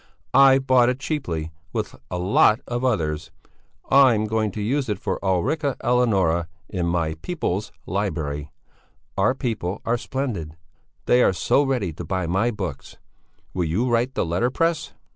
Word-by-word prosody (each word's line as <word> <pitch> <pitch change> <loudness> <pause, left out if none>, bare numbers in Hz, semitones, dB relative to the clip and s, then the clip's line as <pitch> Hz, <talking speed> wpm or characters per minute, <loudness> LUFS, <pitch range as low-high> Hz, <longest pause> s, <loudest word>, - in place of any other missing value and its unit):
I've 135 -1 +6
bought 125 -2 +5
it 125 - -1
cheaply, 90 - -3 0.2
with - - -2 0.2
a 90 - -3
lot 100 +4 +4
of 120 +1 -3
others. 80 -10 0 0.6
I'm 130 -6 +6
going 110 0 0
to - - -5
use 130 +5 -1
it 105 - -1
for - - -3
Ulrica 135 - 0
Eleonora 95 -9 +2 0.2
in 90 -3 -2
my 85 -2 0
People's 105 - -2
Library. 80 -7 -3 0.6
Our 100 +7 +2
people 110 -8 -3
are 120 +1 +1
splendid; 105 - -4 0.5
they 125 - +4
are 95 - +4
so 90 +10 +2
ready 125 - -1
to 85 - -7
buy 95 +2 -2
my 95 +8 +1
books. 95 - -6 0.6
Will 90 -2 0
you 95 +11 0
write 120 +2 +1
the - - 0
letterpress?" 130 - 0
105 Hz, 150 wpm, -23 LUFS, 85-130 Hz, 0.6 s, I've